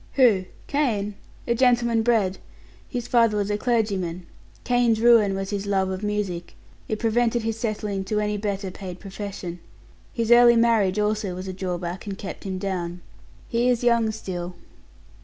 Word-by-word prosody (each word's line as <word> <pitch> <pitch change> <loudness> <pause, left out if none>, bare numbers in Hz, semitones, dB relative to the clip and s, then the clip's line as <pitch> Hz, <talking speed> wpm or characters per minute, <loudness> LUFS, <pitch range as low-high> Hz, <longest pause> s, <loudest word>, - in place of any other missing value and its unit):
"Who? 225 -9 +4 0.2
Kane? 220 -8 0 0.3
A 235 - +3
gentleman 235 -2 +3
bred; 220 -5 +1 0.5
his 245 -1 -4
father 230 -3 +3
was 205 0 0
a 205 - 0
clergyman. 195 -8 -1 0.4
Kane's 245 -3 +2
ruin 225 -4 +5
was 195 +1 -4
his 200 0 -3
love 190 -1 +1
of 185 0 -4
music 205 -4 -3 0.3
it 215 - -2
prevented 235 +1 +1
his 225 0 -2
settling 210 -3 -2
to 210 +2 0
any 210 0 0
better 200 -2 -3
paid 185 -1 -8
profession; 195 -3 -6 0.5
his 230 -2 -1
early 240 0 +8
marriage 225 -5 +3
also 210 -2 0
was 185 +1 -6
a 185 - -4
drawback 180 0 -4
and 195 -1 -4
kept 195 - -7
him 190 -1 -3
down. 180 -2 -3 0.5
He 235 +2 +1
is 245 -1 +1
young 235 -2 +3
still." 180 -5 -5
210 Hz, 160 wpm, -24 LUFS, 190-230 Hz, 0.5 s, early